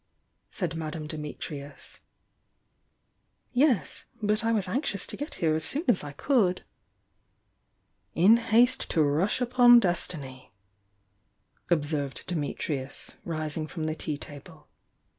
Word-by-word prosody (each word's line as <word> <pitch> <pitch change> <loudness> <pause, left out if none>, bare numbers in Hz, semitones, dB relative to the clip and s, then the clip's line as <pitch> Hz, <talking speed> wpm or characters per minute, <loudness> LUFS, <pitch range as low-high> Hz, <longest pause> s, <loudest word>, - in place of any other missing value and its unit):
said 175 -5 -3
Madame 155 -1 -5
Dimitrius. 150 -2 -7 1.5
"Yes. 245 - +1
But 215 +1 0
I 225 - +2
was 210 -4 +1
anxious 200 -2 -1
to - - -7
get 290 +3 -5
here 160 -2 +1
as 160 0 -1
soon 295 - -1
as 230 -10 +3
I 145 - -6
could." 185 - +1 1.5
"In 205 +7 +6
haste 235 +2 +3
to 160 - +3
rush 155 - +1
upon 245 0 +7
destiny!" 145 - -3 1.2
observed 145 -5 -1
Di - - -2
mitrius, 145 -3 -3
rising 155 -1 -3
from 160 0 -6
the 155 0 -1
tea 155 -2 -4
table. 145 -1 -11
165 Hz, 120 wpm, -28 LUFS, 150-225 Hz, 1.5 s, upon